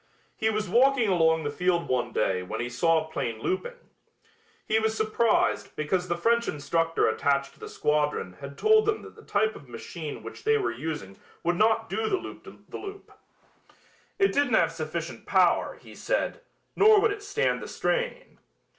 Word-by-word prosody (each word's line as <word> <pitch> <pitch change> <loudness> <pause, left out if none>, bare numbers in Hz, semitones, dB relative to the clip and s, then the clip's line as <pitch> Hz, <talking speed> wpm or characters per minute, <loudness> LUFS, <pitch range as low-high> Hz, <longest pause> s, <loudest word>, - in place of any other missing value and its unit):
He 220 - +1
was 215 -1 -1
walking 245 +2 +4
along 160 -3 +3
the 145 - -2
field 175 +2 0
one 120 -1 0
day 95 -4 0
when 100 +5 -5
he 120 - -2
saw 160 +5 +2
a 160 - -16
plane 115 -7 -3
looping. 190 - -3 0.9
He 220 0 +3
was 220 0 0
surprised 220 +1 +1
because 180 +4 -1
the 175 - -1
French 235 +6 +2
instructor 165 +3 0
attached 140 +5 0
to - - -24
the - - -8
squadron 150 -10 0
had 140 0 -8
told 435 0 +4
them 430 - 0
that - - -11
the 440 - -14
type 215 - 0
of 140 - -13
machine 150 +6 -7
which - - -9
they 440 0 +3
were 415 - -1
using 150 -12 -6 0.2
would 175 +1 +1
not 225 +2 +3
do 440 - -1
the 390 - +2
loop - - -9 0.2
the - - -7
loop. 400 0 -9 1.1
It 390 -1 +3
didn't 280 -5 +2
have - - +3
sufficient 165 +1 -5
power, - - +3
he - - -14
said, - - -2 0.3
nor 430 +1 +7
would 435 +1 +3
it 410 0 -5
stand 415 +3 0
the - - -6
strain. - - -2
185 Hz, 180 wpm, -27 LUFS, -, 1.1 s, nor